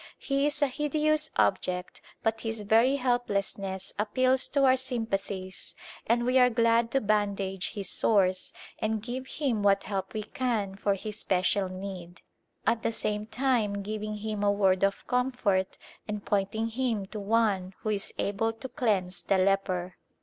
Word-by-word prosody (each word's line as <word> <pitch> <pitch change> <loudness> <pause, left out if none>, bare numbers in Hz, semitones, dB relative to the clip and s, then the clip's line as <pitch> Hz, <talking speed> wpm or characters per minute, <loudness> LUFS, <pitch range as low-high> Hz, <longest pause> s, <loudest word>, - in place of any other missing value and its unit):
He 275 +1 0
is 295 0 0
a - - +4
hideous 300 +2 0
ob - - +3
ject 180 0 -4 0.2
but 225 0 0
his 225 -2 -3
very 230 +6 +4
helplessness 200 -7 -1
appeals 255 +5 +2
to 280 -1 +1
our 260 0 +6
sympathies 200 -7 -4 0.3
and 240 +1 +2
we 255 +1 +4
are 250 0 +6
glad 230 0 +3
to 270 - +4
bandage 200 -3 0
his 200 -3 -4
sores 185 -4 +3 0.3
and 215 -1 -1
give 255 +2 -5
him 260 -9 -1
what 200 -1 +3
help 195 0 -4
we 215 - -2
can 215 -4 -2
for 200 0 0
his 210 +2 -5
special 190 0 +1
need, 185 -2 -8 0.4
at 230 0 +2
the 230 - 0
same 210 -1 -2
time 225 -5 0
giving 215 +1 -4
him 210 0 -4
a 205 - +4
word 195 -2 +2
of 195 0 +1
comfort 245 -7 0 0.3
and 210 -1 -4
pointing 210 +3 0
him 230 -4 -1
to 210 +2 -7
One 200 -3 +1
who 215 - -2
is 210 0 -2
able 225 +3 0
to 260 +4 -8
cleanse 205 -8 0
the 195 - +1
leper. 185 -2 0
215 Hz, 165 wpm, -28 LUFS, 195-240 Hz, 0.4 s, our